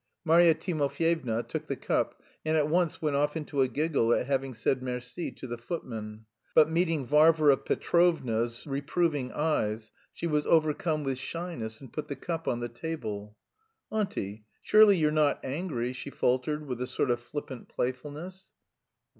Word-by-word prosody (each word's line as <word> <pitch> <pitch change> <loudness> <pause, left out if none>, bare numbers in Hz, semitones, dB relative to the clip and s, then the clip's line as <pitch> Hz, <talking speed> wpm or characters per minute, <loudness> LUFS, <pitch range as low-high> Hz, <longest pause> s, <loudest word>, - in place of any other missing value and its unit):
"_ - - -55 0.2
Marya 165 0 +6
Timofyevna 155 - 0
took - - -4
the - - -2
cup - - -1 0.2
and 155 0 +1
at 150 -1 +2
once 170 0 +1
went 150 -2 +1
off 150 +2 +1
into 145 -3 -1
a 130 - +4
giggle 140 -2 +1
at - - 0
having 135 -1 -1
said 130 +3 0
merci 125 +5 -4
to - - -9
the 120 -2 -5
footman. 110 -6 -6 0.3
But 155 0 +6
meeting 165 -4 +1
Varvara 150 0 +5
Petrovna's 120 -12 +1
reproving 145 -1 -1
eyes, 110 -8 -1 0.2
she - - -6
was 150 -3 +1
overcome 155 -1 +2
with 135 -2 -2
shyness 135 -9 -5
and 135 - -13
put 155 - -4
the 140 - -4
cup 165 +4 -4
on 120 - 0
the 120 - -2
table. 110 -6 -6 0.5
"Auntie, 110 - -3 0.2
surely 215 -2 +7
you're 155 -2 +2
not 150 -2 +2
angry?" 130 -4 -2
she 130 - -6
faltered 140 +4 0
with 125 -3 -4
a 125 - -1
sort 130 0 0
of 120 - +1
flippant 130 0 -7
playfulness. 150 +9 -5
145 Hz, 165 wpm, -29 LUFS, 125-160 Hz, 0.5 s, surely